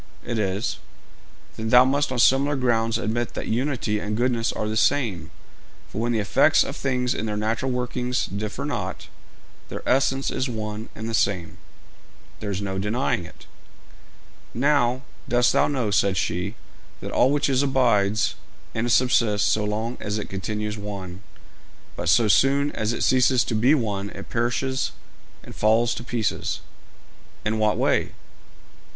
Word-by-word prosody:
'It 120 -2 -2
is.' 100 +1 -1 0.8
'Then, 110 0 -3
thou 125 +2 +7
must 140 +1 +1
on 130 - -2
similar 135 +4 +4
grounds 115 -3 +1
admit 115 +1 -2
that - - -4
unity 120 -3 -1
and 105 +1 -3
goodness 120 -1 +1
are 105 - -3
the 110 - -2
same; 110 -5 +1 0.6
for 110 - -4
when 120 +1 0
the 115 - +1
effects 105 -2 +4
of - - -6
things 125 -2 0
in 110 - -3
their 105 -1 -2
natural 115 +5 -1
working 125 0 -2 0.2
differ 105 0 -4
not, - - -4 0.6
their - - -7
essence 135 +1 +2
is 130 - -2
one 110 -1 -5
and 110 +1 -5
the 115 - -4
same.' 95 -6 0 0.8
'There 105 - -5
is 100 0 -3
no 95 -1 -3
denying 105 -2 -1
it.' 90 - -15 1.1
'Now, 130 -1 +2 0.3
dost 120 0 +3
thou - - +3
know,' 130 -7 -1
said 100 -1 +2
she, 90 +5 -2 0.4
'that - - -6
all 125 - +4
which 145 +1 +1
is 135 -1 +2
abides 115 -7 +2 0.4
and 120 +2 -1
subsists 115 -4 +3
so 105 - +1
long 110 +3 -2
as 105 +1 -3
it 105 - -5
continues 105 +2 -3
one, 95 -2 -7 0.7
but - - -2
so 115 -2 +5
soon 140 +7 +3
as 110 +1 -2
it 115 - -2
ceases 130 -1 +4
to - - -4
be 125 +7 +4
one 100 -6 -2
it - - -10
perishes 125 +3 -1 0.5
and - - -11
falls 115 +2 +3
to - - -6
pieces?' 120 -3 -2 0.8
'In 110 +1 0
what 105 -1 +2
way?' - - +1
115 Hz, 160 wpm, -24 LUFS, 105-125 Hz, 1.1 s, thou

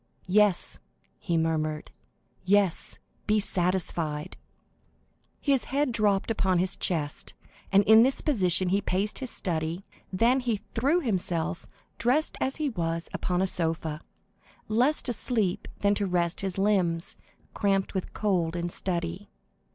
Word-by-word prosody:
"Yes," 200 -1 +4 0.4
he 170 -3 -1
murmured,—"yes, 160 +4 -1 0.3
be 215 0 +3
satisfied." 175 -5 -1 1.0
His 275 -4 +1
head 280 0 0
dropped 210 -2 +1
upon 190 -4 +1
his 185 +2 +1
chest, 150 -5 -1 0.4
and 200 +1 +5
in 220 +2 +7
this 260 +3 +3
position 185 - +1
he 200 +2 +2
paced 200 +3 -1
his 260 - -4
study; 170 -1 -2 0.3
then 235 +7 +3
he 235 -5 -1
threw 285 +10 +2
himself, 180 - -1 0.3
dressed 260 +7 +1
as 265 - 0
he 305 -2 -1
was, 165 -6 -2
upon 180 +1 0
a - - +3
sofa, 165 -3 -1 0.7
less 250 +8 +3
to 245 - -1
sleep 215 -5 0
than 200 0 +3
to 205 -1 -1
rest 175 -1 0
his 195 -1 -3
limbs, 185 -4 +1 0.4
cramped 195 -2 0
with 190 -2 -3
cold 180 -6 0
and 175 0 -3
study. 175 +2 -3
190 Hz, 130 wpm, -27 LUFS, 170-215 Hz, 1.0 s, in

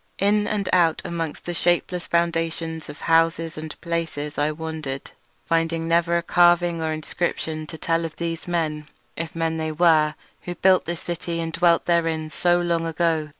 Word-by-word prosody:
In 205 +1 +2
and 205 -3 -1
out 170 -3 +3
amongst 165 -3 -4
the 175 - -3
shapeless 175 +1 0
foundations 165 -1 -1
of - - -10
houses 165 0 +2
and 155 0 -7
palaces 165 -3 -3
I 150 +1 +2
wandered, 155 -4 -5 0.3
finding 165 0 0
never 170 +1 +3
a 170 - -1
carving 175 -1 +4
or 160 0 -1
inscription 155 0 -3
to 160 - -8
tell 165 +1 0
of 165 -2 -5
those 165 -1 -4
men, 155 -3 -1 0.3
if 165 0 -5
men 165 0 -1
they 160 0 -2
were, 155 -2 +4 0.3
who 175 - -5
built 185 +1 +4
the 170 - -2
city 170 0 -4
and 165 -1 -3
dwelt 170 0 +3
therein 165 -2 +1
so 175 +1 +2
long 170 -1 0
ago. 165 -2 0
165 Hz, 170 wpm, -23 LUFS, 160-170 Hz, 0.3 s, carving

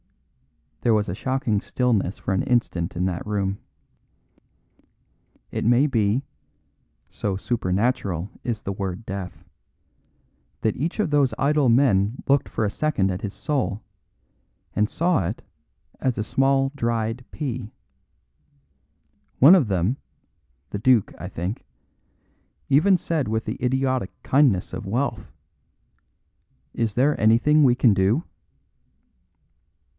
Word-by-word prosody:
There 115 -2 +3
was 105 -1 0
a 90 - -3
shocking 125 -2 -1
stillness 110 -7 0
for 95 - -3
an 95 - +1
instant 120 -10 0
in 90 +1 0
that 90 -3 -2
room. 100 -2 -2 1.9
It - - -3
may 120 +5 +4
be 115 -2 +1 0.8
(so 100 -3 -3
supernatural 100 -3 -1
is 115 -4 -3
the 100 - -3
word 95 +2 -5
death) 95 -2 -6 1.2
that 110 - 0
each 165 - -3
of 175 -8 0
those 140 -3 +2
idle 145 -1 +2
men 115 -3 +2
looked 140 0 +2
for 110 - -1
a 100 - -1
second 105 -9 0
at 90 +2 -4
his 100 -1 -5
soul, 130 -8 -2 0.9
and 105 0 +2
saw 165 - +1
it - - -5 0.6
as 130 -2 -1
a 105 - -1
small 135 +3 +1
dried 115 -1 -1
pea. 125 -7 -4 1.7
One 145 +8 +8
of 170 - +4
them 95 +6 0 0.7
the 100 - -3
duke, 120 -2 +3
I 85 - -5
think 95 +4 -4 1.1
even 160 +8 +5
said 160 -7 -2
with 110 +1 -1
the - - -5
idiotic 130 -3 0
kindness 130 -10 +2
of 110 - -6
wealth: 115 0 -2 1.4
"Is 115 -3 -2
there 140 +4 +2
anything 120 +8 +4
we 125 -3 +5
can 120 -4 +4
do?" 100 - +2
115 Hz, 125 wpm, -23 LUFS, 100-135 Hz, 1.9 s, One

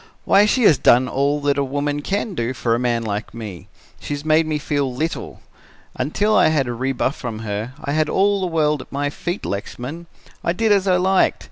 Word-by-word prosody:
'Why, 205 +2 +5
she 250 +3 +2
has 155 - +6
done 125 +2 +5
all 140 +3 0
that 145 0 +1
a - - +2
woman 145 +2 -2
can 200 +6 -2
do 125 -4 -2
for 115 -2 0
a 115 - +1
man 120 -2 0
like 105 +1 -4
me. 105 -7 -8 0.3
She 145 - -4
has 145 +1 -8
made 155 +1 +3
me 155 -1 0
feel 145 -2 -1
little. 155 +7 -4 0.5
Until 205 +11 0
I - - +5
had 150 -4 +1
a 120 - -2
rebuff 130 +3 -1
from 115 -4 -6
her, 105 +4 -4
I 140 - -2
had 155 0 +1
all 200 0 +2
the 185 - 0
world 150 -4 +1
at - - -14
my 145 +1 -1
feet, 175 +5 -4
Lexman. 130 +11 -5 0.4
I 170 - +1
did 220 +3 +1
as 200 -1 +3
I 185 - +4
liked. 190 +1 +2
145 Hz, 220 wpm, -21 LUFS, 125-170 Hz, 0.5 s, has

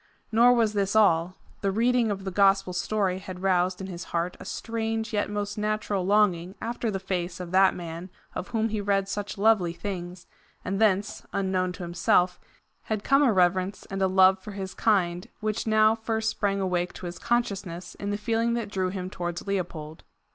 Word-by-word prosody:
Nor 235 +2 +6
was 225 -3 +2
this 200 0 0
all; 180 -4 +4 0.3
the 200 - +1
reading 235 +3 +2
of 195 -2 -3
the 190 - -4
gospel 195 -1 +3
story 190 -1 0
had 185 -1 -8
roused 185 -1 +2
in 190 - -5
his 175 -2 -7
heart 170 +1 -2
a - - -10
strange 225 -1 -3
yet 205 0 0
most 205 0 -3
natural 210 -2 -1
longing 190 -2 +2
after 235 0 -3
the 200 - -1
face 180 -2 -3
of 180 -1 -6
that 190 +1 +5
man 170 +1 -7 0.2
of 180 - -5
whom 225 -1 0
he 215 -1 -2
read 195 -1 +1
such 205 +1 -4
lovely 200 -5 +3
things, 180 -1 -6 0.4
and 195 +3 -2
thence, 205 -1 +1
unknown 190 -2 0
to 180 - -8
himself, 175 +1 +2 0.5
had 215 -2 -2
come 275 +1 +4
a 275 -5 +5
reverence 185 0 +1
and 195 0 -3
a 190 - +4
love 190 0 +5
for 205 +2 -8
his 190 -1 -5
kind, 185 -1 +1
which 215 +1 -2
now 215 0 +5
first 220 0 -1
sprang 200 -1 -1
awake 180 -2 -1
to - - -9
his 175 0 -6
consciousness 195 -7 -2
in 200 - -5
the 205 - -1
feeling 230 +2 0
that 225 -4 -3
drew 185 -2 0
him 185 -1 -4
towards 175 -2 -5
Leopold. 170 -6 -4
195 Hz, 190 wpm, -26 LUFS, 180-215 Hz, 0.5 s, Nor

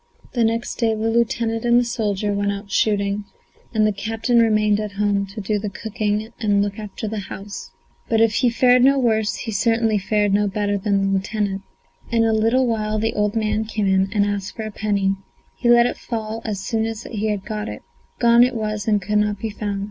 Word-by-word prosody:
The 240 - +2
next 230 +1 -1
day 225 -2 +2
the 220 +1 -1
lieutenant 230 -1 0
and 240 0 +4
the - - +2
soldier 210 -4 -1
went 200 0 0
out 200 0 -7
shooting 200 -1 +1 0.5
and 215 -2 +2
the 215 - +3
captain 225 +4 0
remained 215 -2 +3
at 210 -1 -4
home 200 -1 0
to 205 +3 -7
do 210 +1 -1
the 205 0 -3
cooking 210 +2 -2
and 205 -3 +2
look 205 +1 -4
after 210 +1 -6
the 215 0 -3
house. 200 +1 -7 0.4
But 225 - +2
if 225 -1 +4
he 245 - +3
fared 250 +1 +4
no 275 +1 +5
worse, 220 -4 +1
he 225 - -5
certainly 225 0 +2
fared 205 0 +1
no 205 +1 +3
better 205 +1 -1
than 200 0 +1
the 195 - +1
lieutenant. 195 0 -1 0.5
In 230 -1 +3
a 225 -1 +2
little 225 +4 +3
while 215 -2 -1
the 225 +1 0
old 210 0 0
man 215 0 0
came 215 -1 -2
in 190 0 +2
and 205 -2 +2
asked 200 -2 -3
for 220 - -5
a 215 - -5
penny. 200 -2 0 0.4
He 240 - 0
let 240 0 +7
it - - -2
fall 225 -1 -4
as 210 -4 -2
soon 220 +3 -1
as 225 0 -5
he 210 -1 -2
got 210 +2 -5
it; - - -8 0.3
gone 235 0 +6
it 250 0 +1
was 215 -2 -3
and 210 -1 +3
could 210 +2 +1
not 210 0 0
be 220 +2 -4
found. 205 -1 -3
215 Hz, 215 wpm, -21 LUFS, 205-225 Hz, 0.5 s, let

